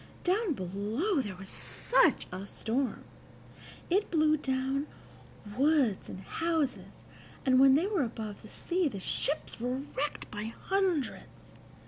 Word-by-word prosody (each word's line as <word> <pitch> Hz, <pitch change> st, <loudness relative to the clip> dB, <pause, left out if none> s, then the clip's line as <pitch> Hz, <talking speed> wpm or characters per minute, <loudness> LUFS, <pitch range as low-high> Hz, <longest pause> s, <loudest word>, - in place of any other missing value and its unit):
Down 380 Hz, 0 st, +2 dB
below 215 Hz, -, -1 dB
there 205 Hz, -6 st, -5 dB
was 190 Hz, +1 st, -9 dB
such -, -, +2 dB
a 185 Hz, +2 st, -6 dB
storm! 245 Hz, +6 st, -2 dB, 0.8 s
It 395 Hz, +4 st, +1 dB
blew 310 Hz, -2 st, +4 dB
down 270 Hz, 0 st, -1 dB, 0.7 s
woods 275 Hz, -7 st, +2 dB
and 185 Hz, -, -7 dB
houses, 325 Hz, -, -2 dB, 0.4 s
and 255 Hz, -1 st, +5 dB
when 270 Hz, 0 st, +8 dB
they 320 Hz, +6 st, +3 dB
were 400 Hz, -4 st, +1 dB
above 220 Hz, -4 st, -5 dB
the 215 Hz, -, -12 dB
sea 355 Hz, -1 st, 0 dB
the 210 Hz, -8 st, -4 dB
ships 285 Hz, +10 st, -1 dB
were 250 Hz, +3 st, -2 dB
wrecked 290 Hz, +2 st, -3 dB
by 210 Hz, 0 st, -4 dB
hundreds. 375 Hz, -8 st, -1 dB
270 Hz, 130 wpm, -31 LUFS, 220-325 Hz, 0.8 s, when